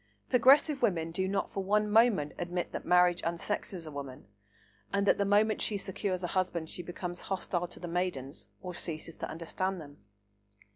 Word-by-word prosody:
Progressive 270 +3 +5
women 170 -8 +1
do 190 +3 -1
not 195 0 -1
for 195 - -2
one 210 +2 +2
moment 210 -8 +4
admit 175 0 -2
that - - -6
marriage 180 0 +5
unsexes 170 +1 -2
a 155 - -7
woman, 140 -3 -7 0.7
and 200 0 +1
that - - +4
the 200 - +2
moment 210 +2 +3
she 210 - +1
secures 190 -1 -3
a - - 0
husband 175 -4 -1
she - - -4
becomes 175 0 -5
hostile 180 -2 -2
to - - -12
the 175 - -6
maidens, 170 -6 -3 0.2
or 180 -1 -5
ceases 165 -1 -4
to - - -4
understand 185 +3 -3
them. 145 -2 -11
180 Hz, 180 wpm, -31 LUFS, 170-200 Hz, 0.7 s, Progressive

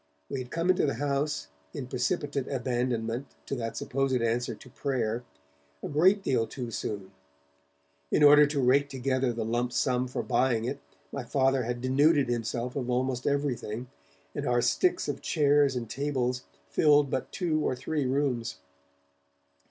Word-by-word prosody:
We 135 - -3
had 125 -1 -6
come 170 +5 +2
into 180 - +2
the 140 - 0
house, 145 - -1 0.3
in 130 - -4
precipitate 140 +2 -1
abandonment 125 -1 -1 0.2
to - - -4
that 115 -1 -4
supposed 135 -1 0
answer 115 0 0
to 130 - -15
prayer, 125 -4 -1 0.6
a - - -2
great 185 +7 +4
deal 115 -7 +1
too 125 -3 -6
soon. 100 -3 -4 1.0
In - - +3
order 145 0 +8
to 145 0 -2
rake 140 +2 +3
together 130 -1 0
the 115 -1 -3
lump 120 +2 0
sum 125 0 +1
for 125 - -3
buying 120 -3 +1
it, 130 +3 -3 0.3
my 140 - -4
Father 135 0 +1
had 120 0 -3
denuded 140 +1 +3
himself 120 +1 -2
of 125 -3 -2
almost 125 0 0
everything, 125 -4 -1 0.4
and - - -3
our 120 0 +3
sticks 360 - +2
of - - -3
chairs 145 -3 +3
and 120 -2 -3
tables 130 -1 -2 0.3
filled 145 - +4
but 130 - -2
two 165 -4 0
or 130 - 0
three 145 +2 -2
rooms. 130 -4 0
130 Hz, 160 wpm, -28 LUFS, 120-145 Hz, 1.0 s, order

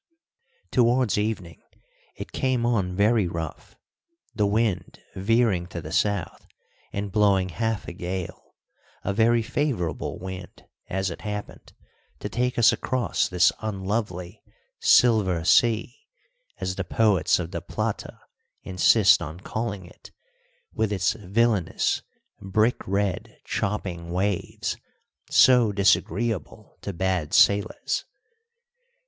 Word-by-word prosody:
Towards 120 -3 +3
evening 105 -6 -3 0.5
it - - -8
came 130 -3 0
on 100 -7 0
very 105 0 +3
rough, 80 -2 -6 0.6
the 105 -2 +1
wind 105 -1 -1 0.2
veering 100 -3 +1
to 90 -1 -6
the 80 -1 -8
south 100 -2 -1 0.4
and 100 0 -4
blowing 100 -2 +3
half 110 +2 -2
a - - -6
gale, 90 0 -6 0.5
a 100 - -1
very 115 +2 +3
favourable 125 - -2
wind, 95 0 -9 0.2
as 95 0 -1
it - - -8
happened, 105 -1 -7 0.4
to 105 - -6
take 125 +4 -1
us 120 - +6
across 130 -2 0
this 90 -1 +4
unlovely 95 -3 -3 0.4
"Silver 100 -8 +4
Sea," 115 +4 +3 0.6
as 95 0 -3
the 95 - -1
poets 100 -1 +2
of 85 -1 -5
the 85 -3 -4
Plata - - -4 0.4
insist 90 -1 +4
on 80 +4 -6
calling 105 -3 -4
it, 90 - -15 0.6
with 110 -2 0
its 95 -3 +1
villainous, 105 -2 0 0.4
brick 110 +5 0
red, 100 0 -2
chopping 90 -4 -3
waves, 95 +2 -2 0.5
so 125 -4 +6
disagreeable 100 0 0
to 100 - -4
bad 90 -4 -1
sailors. 100 +1 +2
100 Hz, 115 wpm, -25 LUFS, 90-110 Hz, 0.6 s, us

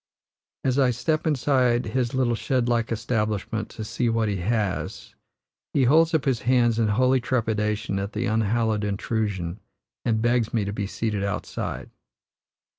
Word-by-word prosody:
As 130 +1 +1
I 130 -2 +4
step 150 +7 0
inside 130 -4 +2
his 125 -1 -1
little 125 -2 +2
shed 125 +1 0
like 115 -1 0
establishment 110 -2 -1
to 110 - -7
see 120 +2 -1
what 115 -1 +1
he 100 - -1
has, 105 +1 -2 0.6
he 135 - +4
holds 160 +6 +4
up 155 - +1
his 130 -4 +1
hands 120 -2 +3
in 115 - +3
holy 130 +4 +3
trepidation 110 -3 -1
at 100 +2 -4
the 110 +3 -1
unhallowed 110 -1 +1
intrusion, 100 -3 -2 0.4
and 110 -2 +1
begs 120 0 +1
me 105 -3 +1
to 100 - -3
be 100 -1 -3
seated 105 -1 -2
outside. 100 +1 -4
115 Hz, 155 wpm, -25 LUFS, 105-125 Hz, 0.6 s, I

